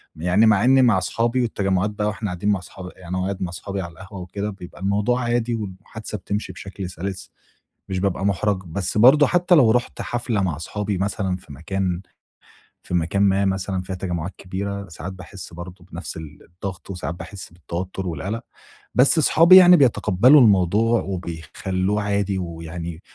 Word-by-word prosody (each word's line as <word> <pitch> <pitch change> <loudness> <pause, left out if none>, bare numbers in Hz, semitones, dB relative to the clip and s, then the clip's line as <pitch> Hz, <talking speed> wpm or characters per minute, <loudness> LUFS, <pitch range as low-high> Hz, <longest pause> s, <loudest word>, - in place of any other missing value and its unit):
يعني 90 +7 +3
مع 110 0 +4
إنّي 130 +1 +5
مع 115 -6 +4
أصحابي، 115 +7 0
والتجمعات 100 -3 0
بقى 105 0 -2
وإحنا 105 0 -3
قاعدين 90 +4 -2
مع 100 -3 +2
اصحاب 90 0 -10
يعني 90 0 -6
قاعد 95 +1 -2
مع 90 - -2
أصحابي 95 +2 -5
على 85 -1 -6
القهوة 95 +3 -10
وكده، 100 +3 -4
بيبقى 95 -2 -11
الموضوع 105 +6 +1
عادي 120 0 0
والمُحادثة 105 +1 -7
بتمشي 100 -1 -4
بشكل 95 0 -7
سَلِس، 95 +2 -6 0.6
مش 95 -1 -2
بابقى 95 0 -1
مُحرَج. 100 0 0
بس 95 +5 -3
برضو 140 +6 +7
حتّى 175 0 +3
لو 125 -8 +6
رُحت 120 +1 0
حفلة 120 -3 -2
مع 85 -6 -1
أصحابي 100 +4 -3
مثلًا 95 -1 -1
في 80 - -13
مكان 90 +4 -3 0.8
في - - -7
مكان 85 +4 +1
ما 100 0 +3
مثلًا 95 -1 -1
فيها 95 0 -6
تجمعات 90 -1 -4
كبيرة، 100 +1 -5
ساعات 85 +4 -7
باحِسّ 95 -1 -10
برضو 90 +1 -9
بنفس - - -6
ال 80 -2 -10
الضغط، 95 +2 -8
وساعات 90 -2 -4
باحِسّ 100 +1 -9
بالتوتّر 90 +2 -5
والقلق. 100 +9 -4 0.5
بس 140 +6 +5
أصحابي 165 +3 +6
يعني 180 -1 +9
بيتقبلوا 125 +1 +5
الموضوع، 105 +3 +4
وبيخلّوه 95 +3 -3
عادي، 100 -1 0
ويعني 85 -1 -6
95 Hz, 165 wpm, -22 LUFS, 90-105 Hz, 0.8 s, يعني